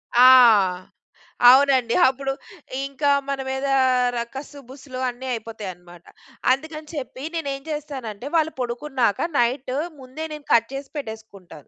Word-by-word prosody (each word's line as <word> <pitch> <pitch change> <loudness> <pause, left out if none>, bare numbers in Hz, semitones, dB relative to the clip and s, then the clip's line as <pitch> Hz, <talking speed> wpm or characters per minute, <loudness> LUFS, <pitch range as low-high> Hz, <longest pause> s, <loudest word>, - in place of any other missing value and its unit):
ఆ! 250 +1 +8 1.2
అవునండి. 260 -3 +4
అప్పుడు 270 +1 -2 0.5
ఇంకా 280 +1 0 0.2
మన 275 -1 -2
మీదా 270 +1 0 0.4
ర - - -2 0.2
కస్సు 285 +1 -8
బుస్సులు 260 -1 -9
అన్నీ 250 +2 -8
అయిపోతాయనమాట. 185 -6 -8 0.5
అందుకని 305 +3 -3
చెప్పి 260 -1 -6
నేనేం 280 -4 -3
చేస్తానంటే 270 -6 -6
వాళ్ళు 320 0 +2
పడుకున్నాక 245 - -1
నైట్ 255 +2 0 0.3
ముందే 260 +5 -7
నేను 300 -1 -9
కట్ 230 0 +3
జేసి 275 0 -7
పెట్టేసుకుంటాను. 220 - -9
260 Hz, 120 wpm, -23 LUFS, 235-280 Hz, 1.2 s, ఆ